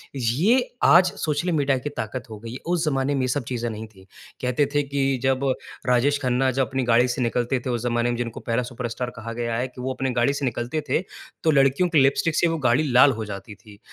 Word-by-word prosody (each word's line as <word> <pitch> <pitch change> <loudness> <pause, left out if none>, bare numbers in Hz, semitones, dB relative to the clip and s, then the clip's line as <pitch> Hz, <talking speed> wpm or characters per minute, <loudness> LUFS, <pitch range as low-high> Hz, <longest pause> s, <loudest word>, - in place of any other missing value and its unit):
ये 160 - +2
आज 180 +2 +6
social 155 +3 0
media 140 -4 +2
की 130 +3 -4
ताक़त 115 +2 -5
हो 110 - -8
गई, 115 +3 -8
उस 175 -1 0
ज़माने 135 -1 0
में 135 - 0
ये 130 - 0
सब 130 +1 -1
चीज़ें 120 -1 -2
नहीं 110 0 -6
थीं। 95 -3 -19 0.4
कहते 125 +3 +1
थे 145 - +3
कि 135 -1 0
जब 135 0 +1 0.4
राजेश 130 +4 +3
खन्ना 130 +1 +1
जब 130 -1 0
अपनी 130 +2 -2
गाड़ी 120 +1 +4
से 125 +1 -2
निकलते 120 +1 0
थे, 125 - -5
उस 120 -2 -1
ज़माने 120 0 0
में 120 - -2
जिनको 120 -2 -4
पहला 115 +1 -1
सुपरस्टार 120 0 -4
कहा 115 +1 -6
गया 115 0 -2
है 125 +2 -1
कि 125 0 -11
वो 130 +1 -2
अपनी 130 -1 -2
गाड़ी 140 +4 +3
से 140 0 -2
निकलते 125 +5 -2
थे 165 - +1 0.4
तो 160 - +4
लड़कियों 140 +5 +3
की 160 -4 +4
लिपस्टिक 155 +4 +2
से 170 - +3
वो 165 - -1
गाड़ी 120 +6 +3
लाल 130 +3 +7
हो 110 - -3
जाती 105 +1 -8
थी। 105 -3 -17
130 Hz, 235 wpm, -24 LUFS, 120-140 Hz, 0.4 s, लाल